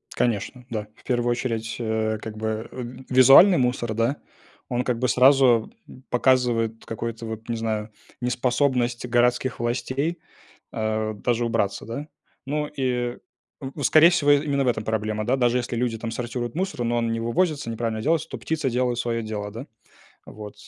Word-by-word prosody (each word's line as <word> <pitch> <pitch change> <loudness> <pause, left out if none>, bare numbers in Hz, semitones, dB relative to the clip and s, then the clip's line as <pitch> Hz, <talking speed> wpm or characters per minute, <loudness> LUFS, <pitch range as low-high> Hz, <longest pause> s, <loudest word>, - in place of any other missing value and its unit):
Конечно, 120 +2 -1
да. 105 -2 -4
В - - -23
первую 120 -1 0
очередь, 115 -2 -2
э, 110 -1 -1
как 110 -1 -7
бы, 110 +1 -3
э, 130 - -6 0.3
визуальный 135 +9 +8
мусор, 125 -3 0
да. 115 +6 0 0.5
Он 125 0 0
как 125 -2 -1
бы 125 - +1
сразу 125 -3 +5 0.4
показывает 120 -3 +1
какой-то 115 0 -5
вот, 110 +1 -7
не 115 - 0
знаю, 110 -1 -2 0.3
неспособность 125 0 0
городских 125 +1 +1
властей, 130 +7 -1 0.5
а, 110 0 -1
даже 120 +3 -1
убраться, 115 -4 -1
да. 120 +7 -6 0.4
Ну 150 +2 -1
и 125 -3 -2 0.4
в 140 +1 -6
скорее 160 +5 +6
всего 160 -5 +2
именно 145 -1 +3
в 125 - +1
этом 110 -3 0
проблема, 110 -1 -2
да. 130 - +2
Даже 120 -1 +2
если 120 -1 -2
люди 115 -2 -1
там 115 0 -4
сортируют 120 0 -4
мусор, 180 -9 -2
но 120 0 0
он 115 -1 0
не 115 - -1
вывозится, 140 +2 0
неправильно 115 -1 -3
делается, 160 +1 +1
то - - -6
птицы 155 -5 -2
делают 125 0 0
свое 115 -1 -1
дело, 105 -1 -4
да? 115 +7 -8 0.6
Вот, 105 -1 -9
120 Hz, 165 wpm, -24 LUFS, 115-130 Hz, 0.6 s, визуальный